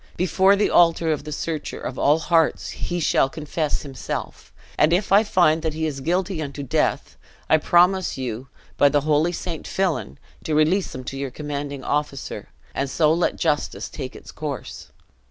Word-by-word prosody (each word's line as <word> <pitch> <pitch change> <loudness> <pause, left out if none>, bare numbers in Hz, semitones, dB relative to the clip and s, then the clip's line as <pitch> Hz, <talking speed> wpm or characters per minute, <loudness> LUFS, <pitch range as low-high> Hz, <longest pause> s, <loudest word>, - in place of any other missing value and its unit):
Before 190 +3 +4
the 205 - +1
altar 165 -1 +4
of 150 -1 -2
the 150 - -6
Searcher 155 +1 -4
of 130 - -5
all 145 +2 +4
hearts 165 -1 +1
he 175 0 -3
shall 135 -4 +2
confess 155 0 -2
himself; 135 -4 -6 0.2
and 150 +2 +3
if 185 +3 +1
I 200 +2 +7
find 175 -6 +3
that 160 -2 -2
he 160 0 -1
is 145 -3 -3
guilty 180 +3 -1
unto 140 -1 -5
death, 135 - -1 0.3
I 155 - +5
promise 180 +3 +3
you 125 0 -4 0.3
by 145 - +6
the 145 0 +2
holy 155 +3 +2
St. 170 -2 -5
Fillan, 170 - -1 0.3
to 155 - -1
release 160 +4 +2
him 130 - -6
to 135 +2 -6
your 140 0 -3
commanding 145 0 -5
officer, 145 -2 -3 0.2
and 135 0 -2
so 155 +3 +3
let 170 +2 +1
justice 150 -3 -1
take 130 -3 -7
its - - -11
course. 150 -3 -6
155 Hz, 175 wpm, -23 LUFS, 140-175 Hz, 0.3 s, I